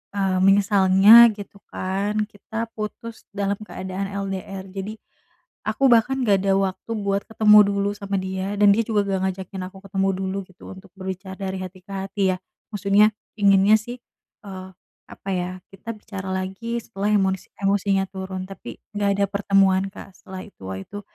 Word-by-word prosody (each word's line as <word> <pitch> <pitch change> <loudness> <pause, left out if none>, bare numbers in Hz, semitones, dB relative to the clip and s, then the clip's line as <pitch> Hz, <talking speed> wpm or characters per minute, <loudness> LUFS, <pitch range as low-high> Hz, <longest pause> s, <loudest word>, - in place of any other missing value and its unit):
eee, 195 -2 +1
menyesalnya 200 +3 +7
gitu 200 0 -10
kan 195 +3 -2
kita 225 +2 -5
putus 220 +1 -6
dalam 200 0 -1
keadaan 190 -1 -5 0.2
LDR 195 0 -5
jadi, 195 +3 -5 0.7
aku 260 +5 +3
bahkan 245 +3 +3
gak 200 -2 +4
ada 195 - +3
waktu 195 +3 -2
buat 200 -1 -1
ketemu 215 -1 +6
dulu 200 0 0
sama 200 -1 -4
dia 190 +1 -3
dan 205 -1 +6
dia 225 - +2
juga 215 -3 +2
gak 195 -1 0
ngajakin 190 0 -7
aku 190 - -15
ketemu 195 0 0
dulu 190 0 -2
gitu 185 - -20
untuk 190 0 -15
berbicara 190 0 -6
dari 190 -1 -3
hati 185 0 -8
ke 200 - -13
hati 195 +1 -3
ya, - - -9 0.4
maksudnya, 205 +2 +4 0.3
inginnya 200 +1 +6
sih, 240 +3 -8 0.5
eee, 190 -1 -8 0.4
apa 195 - -9
ya 180 0 -2 0.2
kita 195 +4 -7
bicara 195 -3 -7
lagi 195 +6 -3
setelah 205 -2 -3
emosi 190 -2 0
emosinya 195 0 +2
turun, 190 -1 -6
tapi 195 - -9 0.2
nggak 205 -1 +1
ada - - +5
pertemuan 195 -1 +3
Kak 190 - -12
setelah 190 -1 -9
itu. 205 - -19
Wah, 95 0 -5
itu 205 - -8
195 Hz, 165 wpm, -23 LUFS, 190-205 Hz, 0.7 s, menyesalnya